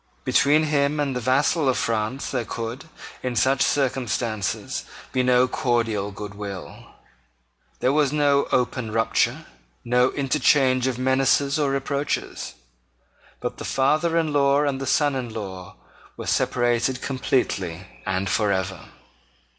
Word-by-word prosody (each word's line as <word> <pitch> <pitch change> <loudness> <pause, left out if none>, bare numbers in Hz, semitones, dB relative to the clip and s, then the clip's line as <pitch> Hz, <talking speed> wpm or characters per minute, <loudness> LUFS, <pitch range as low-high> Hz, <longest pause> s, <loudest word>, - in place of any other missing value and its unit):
Between 150 +3 +4
him 150 -1 +1
and 140 -3 -1
the - - -1
vassal 135 +4 +2
of 130 - +1
France 115 +4 -2
there 125 -3 -1
could, 115 +4 -5 0.4
in 125 -1 -3
such 135 +3 +2
circumstances, 120 -6 -1 0.3
be 130 - +1
no 125 0 +4
cordial 115 -6 0
good 105 0 -7
will. 100 -2 -8 0.9
There 130 - +2
was 145 -2 +2
no 145 -1 +2
open 125 -2 0
rupture, 115 +1 +1 0.4
no 125 +1 +3
interchange 130 -2 +2
of 130 -2 -1
menaces 135 +2 +2
or 145 -2 +2
reproaches. 140 +1 -2 0.9
But - - -4
the - - -5
father 155 +5 +1
in 160 -3 0
law 140 0 +3
and 140 -2 -1
the 135 - -3
son 145 +2 +2
in 125 -3 -4
law 95 -4 -7 0.4
were - - -6
separated 120 +1 +1
completely 100 -10 -1 0.2
and 95 +1 -1
for 100 +2 +1
ever. 95 -1 -2
130 Hz, 135 wpm, -24 LUFS, 115-140 Hz, 0.9 s, Between